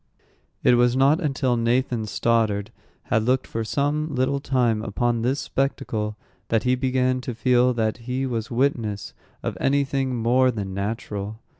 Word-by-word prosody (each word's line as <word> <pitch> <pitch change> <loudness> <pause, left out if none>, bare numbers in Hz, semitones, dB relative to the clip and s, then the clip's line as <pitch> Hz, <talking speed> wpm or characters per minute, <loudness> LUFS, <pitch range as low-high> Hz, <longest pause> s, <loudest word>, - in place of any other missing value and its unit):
It - - +5
was 120 0 +3
not 140 +6 +4
until 135 -5 0
Nathan 120 -1 0
Stoddard 110 -1 +1 0.3
had 115 - +1
looked 125 +4 +1
for 115 - -3
some 145 +5 -1
little 130 +2 +1
time 125 -6 +1
upon 115 +2 -1
this 130 +4 0
spectacle 110 -6 -2 0.3
that 115 -1 +1
he 125 - +2
began 130 0 +1
to 125 -2 -5
feel 125 +1 +3
that 110 -1 0
he 125 +3 -3
was 115 -3 -3
witness 115 -5 -1 0.3
of - - -2
any 140 +1 +3
thing 135 -2 -1
more 125 +3 +3
than 100 -5 -3
natural. 105 0 -4
125 Hz, 155 wpm, -24 LUFS, 115-130 Hz, 0.3 s, It